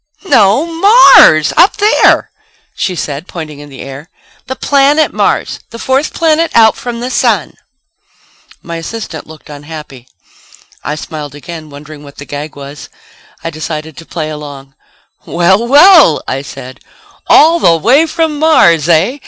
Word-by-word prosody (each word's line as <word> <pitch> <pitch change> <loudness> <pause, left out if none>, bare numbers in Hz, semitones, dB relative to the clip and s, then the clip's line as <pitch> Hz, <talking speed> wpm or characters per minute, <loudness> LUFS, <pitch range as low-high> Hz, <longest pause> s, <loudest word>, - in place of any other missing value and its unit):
"No, 220 - +2
Mars! 335 - +5
Up 370 - +4
there," 420 +1 +2 0.4
she 185 - -3
said, 150 +1 -6
pointing 155 -4 -9
up - - -11
in - - -16
the 135 - -12
air. 135 +4 -10 0.4
"The 260 - -5
planet 285 +3 +1
Mars. - - -1
The 230 - -10
fourth 265 +5 -1
planet 325 0 0
out 220 -2 +4
from 240 -1 -7
the 250 +1 -5
sun." 225 - 0 1.1
My 170 -1 -7
assistant 165 -1 -8
looked 160 0 -15
unhappy. 145 -3 -11 0.8
I 150 - -4
smiled 150 -2 -8
again, 160 +1 -10
wondering 145 +1 -12
what 140 -1 -14
the 140 - -10
gag 145 +2 -8
was. 140 +1 -11 0.5
I 165 - -4
decided 155 0 -7
to 165 - -11
play 155 -2 -5
along. 140 -3 -10 0.5
"Well, 190 +7 +1
well," 295 - +5
I 135 +1 -3
said, 130 -2 -11 0.5
"all 330 +3 +4
the 165 - +3
way 270 - +2
from 315 -2 -2
Mars, 170 - +3
eh? 175 - +1
165 Hz, 150 wpm, -11 LUFS, -, 1.1 s, Mars